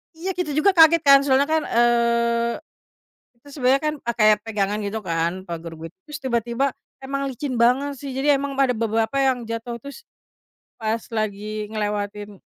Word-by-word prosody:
Iya 365 +4 -4
kita 350 -5 -2
juga 390 +6 +4
kaget 330 -2 +6
kan 275 -1 +8
soalnya 275 +1 +3
kan, 315 -1 +1
eee, 235 0 +2 0.8
itu 285 - -21
sebenernya 270 0 +2
kan, 305 - 0
pake 235 -2 0 0.2
pegangan 210 -2 -1
gitu 205 +2 -3
kan 165 -1 0 0.2
pager 165 -1 -6
wit 165 0 -8 0.2
terus 300 +1 -7
tiba-tiba 240 +2 0 0.3
emang 275 +1 -3
licin 265 0 -4
banget 270 +3 +2
sih 280 -1 -6
jadi 285 +2 +3
emang 280 -1 -4
ada 265 -2 +4
beberapa 225 +3 -1
yang 260 -3 +1
jatuh 230 +1 -5
terus, 280 - -11 0.8
pas 225 +1 -1
lagi 215 0 -3
ngelewatin, 205 -1 -4
235 Hz, 160 wpm, -22 LUFS, 215-275 Hz, 0.8 s, kan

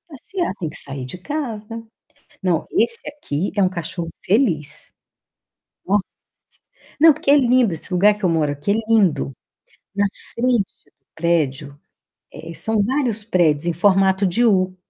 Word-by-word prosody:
passear, 340 - -4
tem 165 -4 -3
que - - -10
sair 135 -2 -6
de 130 +8 -8
casa. 230 - -5 0.6
Não, 175 -4 0
esse 460 +5 +1
aqui 200 - -3
é 200 - +3
um 185 - +3
cachorro 170 -1 -4
feliz. 185 - 0 0.9
Nossa. 200 +1 +2 1.0
Não, 320 -1 +8
porque 280 -1 0
é 290 - +7
lindo, 250 -6 +3
esse 165 +4 -6
lugar 205 +3 +4
que 210 - -16
eu - - +3
moro 160 -3 +1
aqui 145 +8 -2
é - - +3
lindo. 195 -11 +3 0.6
Na 205 +1 +2 0.3
frente 240 -3 +2 0.2
do - - -30 0.2
prédio, 145 -4 -1 0.5
eh, 165 +1 -9
são 220 +4 0
vários 240 -2 0
prédios 170 -7 +2
em 170 - +2
formato 190 +2 +3
de 210 +7 +2
u. 185 -4 +2
195 Hz, 155 wpm, -21 LUFS, 165-235 Hz, 1.0 s, Não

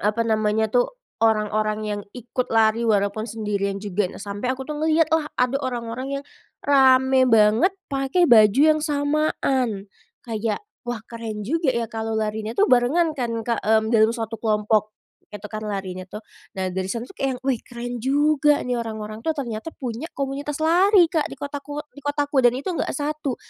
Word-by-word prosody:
apa 210 +3 +1
namanya 220 -1 +1
tuh, 245 0 +3 0.3
orang-orang 215 -1 +1
yang 210 -1 -3 0.2
ikut 245 +1 -3
lari 225 0 +3
walaupun 205 +2 +1
sendirian 205 -2 -2
juga. 200 -1 -1
Nah, - - -11
sampai 205 +4 -5
aku 265 - -6
tuh 300 +1 -5
ngelihatlah 315 -1 +2
ada 250 +2 +2
orang-orang 245 0 -4
yang 280 - -7 0.4
ramai 260 -2 +5
banget 225 - +4 0.2
pakai 275 +6 +2
baju 215 -5 +6 0.2
yang 310 - -2
samaan. 285 -7 0 0.4
Kayak, 225 - -3 0.2
"Wah, 240 - -1
keren 225 -3 -6
juga 320 - -1
ya 235 - 0
kalau 225 0 -3
larinya 220 +1 -3
tuh 410 - +5
barengan," 300 +7 +3
kan, 240 -5 -3
Kak, 235 0 -1
mmm, 220 +1 +2
dalam 225 +1 +4
suatu 225 -1 -5
kelompok 215 -1 +1 0.3
itu 210 0 -10
kan 215 0 -6
larinya 190 -3 -4
tuh. 210 - -6 0.4
Nah, 185 -1 -2
dari 190 0 -2
sana 235 0 -3
tuh - - -14
kayak 275 - -1
yang, - - -14
"Wih, 255 -4 +1
keren 240 0 -5
juga," 295 +2 +3
nih 250 - 0
orang-orang 215 -1 -6
tuh 320 - 0
ternyata 235 0 -4
punya 250 +5 -5
komunitas 280 +1 -3
lari, 355 +4 +5
Kak, 320 -2 -1
di - - -8
kotaku 290 +1 -6
di 285 - -12
kotaku, 290 -1 +1
dan 245 +1 +4
itu 285 +8 -3
nggak - - -2
1 295 -3 -2
240 Hz, 175 wpm, -23 LUFS, 215-285 Hz, 0.4 s, baju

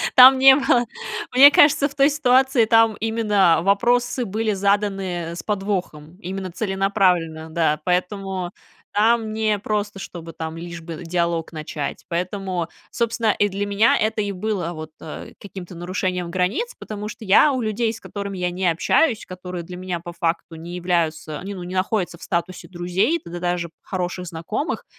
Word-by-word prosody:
Там 260 +1 +10
не 265 0 +8
было. 260 -4 +2 0.5
Мне 275 +3 +9
кажется, 285 -1 +5
в 280 - -14
той 275 0 +5
ситуации 265 -4 +3
там 225 0 +4
именно 210 -6 +3
вопросы 240 +6 +2
были 220 +2 -1
заданы 195 -4 -1
с - - -6
подвохом, 185 -6 -3
именно 190 -1 -5
целенаправленно, 185 -5 0
да. 160 -2 +1
Поэтому 185 0 -1 0.4
там 220 +1 +2
не 215 -1 0
просто, 205 -1 -2
чтобы 165 -3 -8
там 160 0 -6
лишь 170 0 -7
бы 165 0 -8
диалог 170 -1 -1
начать, 155 -2 -5
поэтому, 180 0 -2 0.2
собственно, 230 -1 0
и 205 - +3
для 200 +1 -3
меня 205 +3 +4
это 220 0 0
и 205 -1 -2
было 185 -3 -3
вот, 155 -1 -7
э, 155 - -9
каким-то 190 -3 -9
нарушением 180 0 -3
границ, 185 - -1
потому 210 -1 -6
что 220 +1 -9
я 215 +9 +5
у 260 -2 -1
людей, 220 +1 -1
с 225 - -10
которыми 200 -2 -6
я 180 0 0
не 180 +1 -1
общаюсь, 215 - +1
которые 180 -1 -6
для 180 +2 -9
меня 180 -1 -4
по 175 +1 -8
факту 170 -1 -2
не 170 +2 -8
являются, 165 -4 -1
ну, 195 -2 -6
не 180 +1 -6
находятся 185 -2 -1
в - - -14
статусе 175 +1 -3
друзей, 180 - 0
да 175 +1 -7
даже 175 -1 -2
хороших 180 -1 -4
знакомых, 170 - -4
190 Hz, 165 wpm, -22 LUFS, 175-220 Hz, 0.5 s, Там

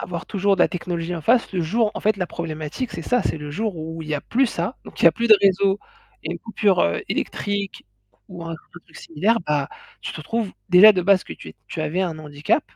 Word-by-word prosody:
avoir 170 -2 -5
toujours 200 -1 +1
de - - -2
la - - +4
technologie 175 -1 -3
en 165 - -5
face 230 +7 +2
le 185 - 0
jour 210 +7 +1
en - - -5
fait 215 0 +2
la 180 -2 -2
problématique, 160 - -5
c'est 170 - -5
ça, 245 +7 +1
c'est - - -1
le 150 0 -7
jour 205 +3 -2
où 160 +1 -6
il 155 - -10
y 155 - 0
a 145 - -2
plus 260 +2 +1
ça, 185 +4 -3
donc - - -11
il - - +2
y - - +11
a 160 - +1
plus 235 +7 -1
de 215 - +9
réseau 195 0 +3 0.4
et - - -4
coupure, 210 -4 +1
heu, 85 - +1
électrique 200 -1 -3 0.4
ou 175 -2 -8
un 165 - -5
autre 160 - -9 0.2
truc 160 - -17
similaire, 195 +9 0
bah, 145 -2 0 0.3
tu - - -5
te 155 - -7
trouves 225 +5 -2 0.2
déjà 205 +4 +9
de 185 - 0
base 190 0 +4
que - - -8
tu - - -11
es - - -12
tu 160 - -5
avais 155 +4 -1
un 165 -4 -3
handicap, 150 - 0
180 Hz, 255 wpm, -22 LUFS, 160-205 Hz, 0.4 s, y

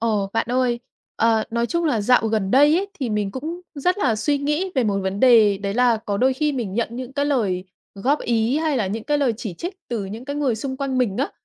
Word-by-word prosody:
ồ, 210 -4 0
bạn 225 - 0
ơi, 250 -1 +1 0.4
ờ, 225 -1 +2
nói 235 +1 0
chung 340 +5 -1
là 250 -9 +1
dạo 235 +2 +3
gần 215 -3 0
đây 290 +6 +5
ấy 390 +3 0
thì 250 -4 -1
mình 210 -2 -1
cũng 315 - -5
rất 360 +7 0
là 245 - +1
suy 285 +6 0
nghĩ 300 +7 -1
về 260 -3 +2
một 200 -2 0
vấn 190 +1 -3
đề 220 -6 +6
đấy 200 0 -3
là 245 -1 +3
có 205 -2 -3
đôi 260 +5 +3
khi 300 +2 0
mình 235 -8 -3
nhận 235 +1 0
những 250 +2 -7
cái 285 +1 0
lời 210 -11 0 0.3
góp 260 +9 +1
ý 235 +2 +1
hay 310 -3 0
là 210 -5 0
những 215 +3 -4
cái 295 0 +1
lời 265 -4 +2
chỉ 215 -7 -6
trích 350 - -5
từ 230 -4 -2
những 215 +5 -7
cái 285 +1 -4
người 275 -5 +1
xung 265 +4 -4
quanh 270 -2 -2
mình 225 -6 0
á, 275 - -1
245 Hz, 255 wpm, -22 LUFS, 215-280 Hz, 0.4 s, đề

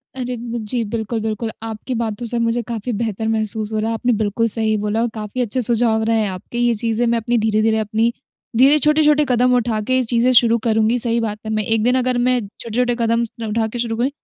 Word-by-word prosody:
अरे, 250 -1 -4
ब 235 0 -5
जी, 240 -2 -1
बिल्कुल, 220 +1 -3
बिल्कुल। 220 +1 -3
आपकी 225 +3 -5
बातों 225 0 -3
से 235 +1 -3
मुझे 230 +1 0
काफ़ी 235 +1 -4
बेहतर 220 -1 -2
महसूस 220 -1 -2
हो 215 - -1
रहा 220 +1 -1
है, 230 - -1
आपने 245 +2 0
बिल्कुल 215 +2 0
सही 220 0 +2
बोला 210 +2 -1
और 235 - +1
काफ़ी 215 +3 -4
अच्छे 245 +2 -1
सुझाव 230 -1 +3
रहे 225 0 +1
हैं 210 - -1
आपके। 185 +5 -7
ये 240 -1 +2
चीज़ें 230 +2 0
मैं 235 0 +2
अपनी 235 +1 0
धीरे-धीरे 220 0 +1
अपनी 220 +2 0 0.5
धीरे 275 +4 +6
छोटे-छोटे 300 0 +4
कदम 250 0 +3
उठा 230 -2 0
के 255 - +1
ये 260 - +2
चीज़ें 240 +1 +2
शुरू 235 -1 +5
करूँगी। 220 +2 +2
सही 235 0 +2
बात 210 -1 -3
है 220 - -3
मैं 215 0 0
1 225 0 +1
दिन 250 +2 +2
अगर 250 -1 0
मैं 255 -1 +2 0.2
छोटे-छोटे 240 +1 0
कदम 230 0 +1
स 230 - -4 0.2
उठा 220 +1 0
के 240 +2 -6
शुरू 230 -1 -2
करूँ, 250 +3 +1
230 Hz, 235 wpm, -19 LUFS, 220-240 Hz, 0.5 s, धीरे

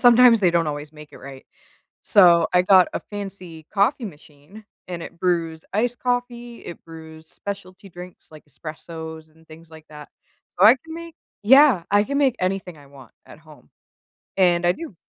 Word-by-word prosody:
sometimes 240 -2 +6
they 180 - +3
don't 170 -1 0
always 145 +1 -7
make 150 -1 -14
it - - -13
right. 135 -1 -12 0.6
So 170 -4 +5
I 180 - +5
got 185 -1 +5
a - - -2
fancy 185 -6 -8
coffee 220 +5 +1
machine, 155 +4 -14 0.2
and 175 -2 -6
it 170 - -11
brews 165 -3 -2
iced 240 +3 -1
coffee, 245 -1 -4
it 170 - -11
brews 160 -1 -13
specialty 195 -1 -9
drinks 180 +1 -13
like 155 - -14
espressos 160 +2 -10
and 160 0 -25
things 160 +1 -16
like 160 -1 -14
that. 150 -1 -12 0.4
So 190 - +2
I 225 - +8
can 320 0 -10
make 335 0 -10 0.3
Yeah, 265 - +5
I 205 0 +4
can 280 +5 -3
make 270 -4 +2
anything 185 -2 -3
I 140 -1 -17
want 135 -3 -16
at - - -15
home, 155 - -19 0.7
and 175 -2 +2
I 175 - +3
do. 320 - -10
175 Hz, 180 wpm, -22 LUFS, 160-210 Hz, 0.7 s, I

